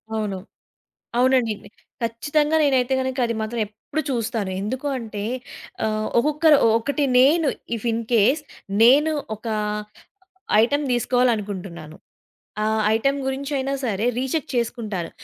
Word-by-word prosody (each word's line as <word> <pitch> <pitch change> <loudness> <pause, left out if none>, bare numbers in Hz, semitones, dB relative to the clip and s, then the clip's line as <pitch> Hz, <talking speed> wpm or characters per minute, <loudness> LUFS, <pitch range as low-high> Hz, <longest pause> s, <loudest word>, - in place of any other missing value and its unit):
అవును. 210 -3 -2 0.8
అవునండయితే. 245 -5 +2 0.3
ఖచ్చితంగా 295 +7 +1
నేనైతే 265 -2 +2
గనుక 260 0 -3
అది 230 - -2
మాత్రం 225 +1 -3
ఎప్పుడు 220 +8 -5
చూస్తాను. 225 -5 -2
ఎందుకు 255 +8 -3
అంటే, 215 -3 -6 0.6
ఆహ్, 215 0 -1
ఒక్కొక్కరు 300 +3 +4 0.2
ఒకటి 285 +5 -1
నేను 295 +4 +5 0.3
ఇఫ్ 230 +2 -7
ఇన్‌కేస్ 230 +5 +2 0.4
నేను 290 +7 +6 0.2
ఒక 220 - -13 1.2
ఐటమ్ 285 +5 +1
దీసుకోవాలనుకుంటున్నాను, 205 -10 -1 0.7
ఆ! - - +1 0.3
ఐటమ్ 275 +5 +1
గురించయినా 275 0 -2
సరే 215 0 -1
రీచెక్ 265 +4 -2
చేసుకుంటాను. 220 -7 -2
245 Hz, 105 wpm, -23 LUFS, 215-275 Hz, 1.2 s, నేను